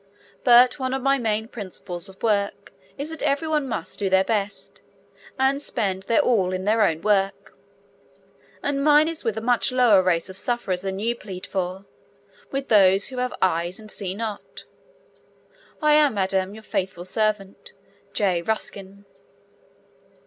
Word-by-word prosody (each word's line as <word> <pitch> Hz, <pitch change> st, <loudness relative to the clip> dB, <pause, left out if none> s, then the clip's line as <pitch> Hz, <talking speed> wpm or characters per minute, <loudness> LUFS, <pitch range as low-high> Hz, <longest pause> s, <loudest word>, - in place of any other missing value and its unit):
But 250 Hz, +2 st, +6 dB
one 260 Hz, 0 st, -1 dB
of 265 Hz, -, -4 dB
my 275 Hz, 0 st, +3 dB
main 220 Hz, -1 st, -1 dB
principles 190 Hz, -4 st, -6 dB
of 190 Hz, -, -17 dB
work 205 Hz, -3 st, -1 dB, 0.2 s
is 290 Hz, +3 st, -4 dB
that 320 Hz, -, -4 dB
every 290 Hz, +2 st, 0 dB
one 300 Hz, -3 st, 0 dB
must 235 Hz, -, -4 dB
do 200 Hz, -2 st, 0 dB
their 190 Hz, 0 st, +4 dB
best, 205 Hz, -2 st, -3 dB, 0.6 s
and 270 Hz, +2 st, +2 dB
spend 195 Hz, -9 st, -2 dB
their 230 Hz, -, +4 dB
all 210 Hz, -9 st, +2 dB
in 185 Hz, 0 st, -3 dB
their 220 Hz, +2 st, +2 dB
own 165 Hz, -6 st, +1 dB
work, 195 Hz, -2 st, 0 dB, 1.1 s
and 275 Hz, -1 st, -1 dB
mine 300 Hz, +1 st, +5 dB
is 330 Hz, -1 st, -5 dB
with 225 Hz, -2 st, -1 dB
a -, -, -2 dB
much 245 Hz, +1 st, +2 dB
lower 245 Hz, -6 st, +5 dB
race 175 Hz, -2 st, +1 dB
of 190 Hz, 0 st, -10 dB
sufferers 205 Hz, -7 st, -2 dB
than 190 Hz, 0 st, -4 dB
you 230 Hz, +4 st, -1 dB
plead 190 Hz, -5 st, -8 dB
for 190 Hz, 0 st, -4 dB, 0.6 s
with 275 Hz, 0 st, -3 dB
those 195 Hz, -1 st, +4 dB
who 260 Hz, -, -8 dB
'have 250 Hz, 0 st, -2 dB
eyes 175 Hz, +1 st, 0 dB
and 215 Hz, -1 st, -8 dB
see 190 Hz, -2 st, -4 dB
not.' 215 Hz, -1 st, -6 dB, 1.2 s
I 300 Hz, 0 st, +5 dB
am, 295 Hz, -5 st, +4 dB
Madam, 190 Hz, 0 st, 0 dB
your 220 Hz, -, -12 dB
faithful 185 Hz, -4 st, -3 dB
servant, 215 Hz, -, -2 dB, 0.4 s
J. 185 Hz, -5 st, +1 dB
Ruskin. 200 Hz, 0 st, -5 dB
210 Hz, 160 wpm, -24 LUFS, 190-250 Hz, 1.2 s, But